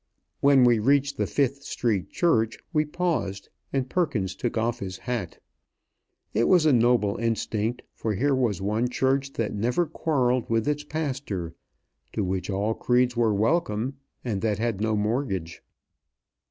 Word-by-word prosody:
When 140 -2 +5
we 120 -2 +5
reached 140 +4 +2
the - - 0
Fifth 140 0 0
Street 115 -8 -1
Church, 115 -10 +1 0.2
we 155 -1 +2
paused, 150 - -2 0.2
and 135 -2 -1
Perkins 130 - 0
took 120 +5 -3
off 115 +2 0
his 95 -3 -5
hat. 115 -6 -4 1.0
It 115 - +2
was 180 -4 +5
a 150 - +5
noble 115 -4 +3
instinct, 115 0 -1
for 110 -2 -2
here 140 +7 +2
was 115 -8 0
one 110 +5 0
church 135 +2 0
that 115 -2 -2
never 120 +11 +1
quarrelled 130 -6 0
with 115 +1 +1
its 150 0 0
pastor, 135 - -3 0.6
to 105 - -1
which 95 +1 -2
all 100 +3 0
creeds 125 +1 +2
were 115 -2 +3
welcome, 115 +2 0 0.3
and 105 -5 -2
that 105 -3 0
had 110 -2 -1
no 110 0 +1
mortgage. 105 - -2
120 Hz, 155 wpm, -26 LUFS, 105-140 Hz, 1.0 s, When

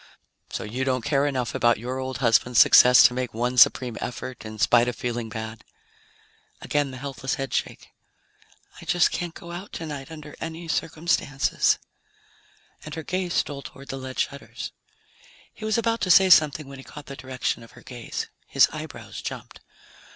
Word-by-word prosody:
"So - - -4
you 120 +5 -3
don't 130 -3 0
care 145 -1 +2
enough 130 -4 -2
about 120 0 +3
your 125 +4 -4
old 130 -1 -4
husband's 115 +1 +3
success 125 0 +8
to - - +6
make 125 -3 -3
one 125 +2 -1
supreme 120 +1 +5
effort 125 +1 -6
in 110 0 -8
spite 120 +2 +4
of 125 - -2
feeling 120 -2 -3
bad?" 110 0 -7 1.0
Again 145 -1 0
the 130 - -8
helpless 135 0 -4
headshake. 135 -1 -3 0.9
"I - - -11
just 175 -2 +3
can't 175 -2 -4
go 170 - -10
out 180 +4 -7
tonight, 150 -4 -6
under 155 -2 -10
any 165 +1 -6
circumstances." 160 -4 +1 1.1
And 150 - -7
her 160 - -5
gaze 180 +1 -2
stole 140 -1 -1
toward 135 +1 -12
the 135 - -4
lead 130 0 -7
shutters. 140 0 -4 0.8
He 215 - -8
was 215 +1 +1
about 230 0 0
to 185 - 0
say 190 +1 +7
something 155 -3 +5
when 135 -1 -10
he - - -10
caught 150 +1 -11
the 140 - -8
direction 130 -2 -3
of 115 - -15
her - - -15
gaze. 120 -3 -6 0.2
His - - +5
eyebrows - - -8
jumped. - - -7
135 Hz, 175 wpm, -25 LUFS, 125-155 Hz, 1.1 s, success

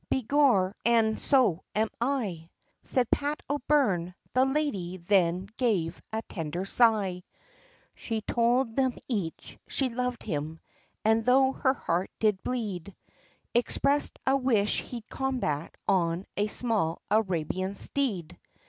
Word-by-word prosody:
"Begor, 250 -7 +3
an' 225 -2 +3
so 235 - +2
am 220 +1 +2
I," 215 -11 -2 0.3
Said 250 -3 +2
Pat 290 +1 0
O'Byrne. 255 - +1 0.2
The 255 +1 +4
lady, 265 - -1
then 180 0 +1
gave 190 -9 0
a 220 +1 -2
tender 170 0 -4
sigh, 200 -5 +3 0.7
She 225 -2 -4
told 235 +1 +1
them 260 -2 +1
each, 200 -10 -4
she 265 -2 0
loved 250 0 -3
him, 155 -3 -4 0.5
and 220 +1 +3
though 265 +2 +4
her 265 0 +1
heart 175 -3 -1
did 210 -3 +2
bleed, 200 -7 -4 0.6
Expressed 280 +4 +2
a 265 - +4
wish, 235 -6 +2
he'd 235 -2 -8
combat 245 - -2
on 175 -1 +1
a 205 - +1
small 210 -8 -1
Arabian 185 -2 0
steed. 205 - -2
220 Hz, 120 wpm, -28 LUFS, 180-255 Hz, 0.7 s, The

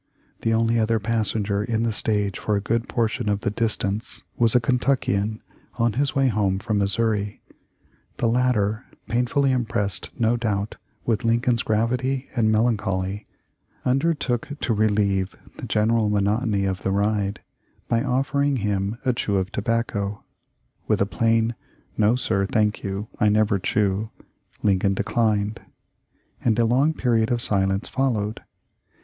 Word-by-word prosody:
The 115 - +1
only 115 +1 +2
other 110 +1 +2
passenger 105 -2 -1
in 115 0 -1
the 115 - +1
stage 105 -2 -1
for 105 - 0
a - - +1
good 115 +4 -1
portion 115 -1 0
of 100 0 0
the 100 - -1
distance 105 -1 -2
was 115 -1 +2
a - - +7
Kentuckian, 115 -4 0 0.3
on 115 -2 +1
his 140 +4 0
way 135 -1 +3
home 100 -5 +1
from 105 +1 -1
Missouri. 105 0 0 0.7
The 120 - +1
latter, 115 -2 +1 0.2
painfully 125 +3 +1
impressed 110 -6 -1
no 115 +1 +2
doubt 105 -3 -2 0.3
with 115 0 0
Lincoln's 115 +1 +2
gravity 125 +5 0
and 110 -3 +3
melancholy, 105 -3 0 0.6
undertook 135 -2 +1
to 115 - +1
relieve 100 -3 +1 0.2
the - - -6
general 110 0 +2
monotony 105 0 +1
of 95 -1 -2
the - - -1
ride 100 +1 0 0.5
by 115 -1 +1
offering 140 +2 +1
him 105 -1 -1
a 130 - +3
chew 105 -4 -1
of 95 +1 0
tobacco. 105 -2 -2 0.6
With - - +2
a 100 - +3
plain 115 +2 +1 0.4
"No, 110 +2 +3
sir, 100 -6 0
thank 105 0 +1
you; 100 +2 -3
I 105 - +4
never 105 -1 +2
chew," 100 +2 0 0.5
Lincoln 100 -1 +2
declined, 105 0 0 0.8
and 110 -3 +2
a 120 - +3
long 135 +7 +2
period 115 -5 +1
of 120 - +1
silence 95 -2 +1
followed. 110 -6 -1
110 Hz, 145 wpm, -24 LUFS, 100-120 Hz, 0.8 s, a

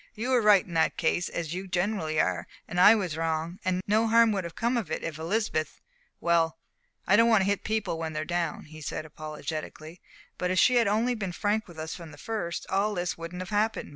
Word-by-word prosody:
"You 240 +5 -2
were 250 -2 +4
right 210 -3 +5
in 175 - -10
that 160 -1 +2
case, 175 +1 0
as 165 -2 -4
you 190 +2 -5
generally 175 -4 -1
are, 90 -2 0 0.2
and 175 - -3
I 210 +4 +9
was 185 -7 -2
wrong; 165 +2 -2
and 185 0 0
no 220 +2 +2
harm 230 0 +5
would 195 -3 -1
have 170 - -7
come 235 +2 0
of 225 -9 -2
it - - -3
if 155 -2 -5
Elizabeth 165 -2 -1 0.4
well, 165 -1 +2 0.5
I 190 - +4
don't 230 +2 +5
want 220 -3 +5
to - - +1
hit 200 0 0
people 215 -6 -1
when 160 -1 -3
they're 155 0 -3
down," 170 -2 -2
he 155 +1 -12
said, 155 - -4
apologetically 155 +2 -7 0.4
"but 180 - 0
if 185 - 0
she 250 +5 +5
had 230 -3 +4
only 225 +5 +2
been 200 -6 -3
frank 210 +4 0
with 170 -2 -13
us 160 +1 -5
from 170 -3 -9
the 145 - -13
first, 175 -1 -4
all 205 +2 0
this 175 -1 -2
wouldn't 170 +2 -6
have 185 - -10
happened. 215 +2 0
180 Hz, 230 wpm, -28 LUFS, 160-210 Hz, 0.5 s, I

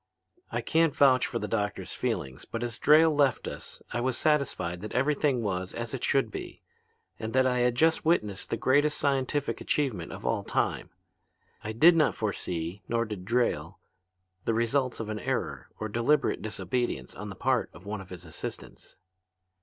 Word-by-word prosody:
"I - - -1
can't 165 -3 +2
vouch 130 -2 +5
for 120 - -3
the - - -3
doctor's 105 -2 -2
feelings, 65 -1 -3
but 115 +1 -5
as 120 -1 -4
Drayle 155 +1 +6
left 140 -3 +2
us - - -8
I 120 - -1
was 130 -1 0
satisfied 140 - 0
that 105 - -6
everything 135 -1 +2
was 95 -3 -2
as - - -4
it - - -4
should - - +2
be, - - -7 0.6
and 110 0 -4
that 130 0 +4
I 125 -1 +2
had 125 0 +2
just 160 +5 +3
witnessed 105 - +1
the 115 - -1
greatest 145 +5 +3
scientific 140 0 0
achievement 120 - -1
of - - -8
all - - 0
time. - - -1 0.7
I 110 - -3
did 160 +10 +6
not 155 -2 +3
foresee, 90 -3 -3
nor 115 0 +1
did 105 -5 -6
Drayle, 120 +3 0 0.7
the 115 - +1
results 120 +2 +1
of 110 -2 -4
an 110 0 -3
error - - -3
or 110 - -2
deliberate 120 +7 +1
disobedience 110 - -2
on - - -7
the - - -7
part - - +1
of 85 +5 -14
one 105 0 -4
of 95 - -12
his 90 -1 -9
assistants. 80 - -8
120 Hz, 175 wpm, -28 LUFS, 105-140 Hz, 0.7 s, Drayle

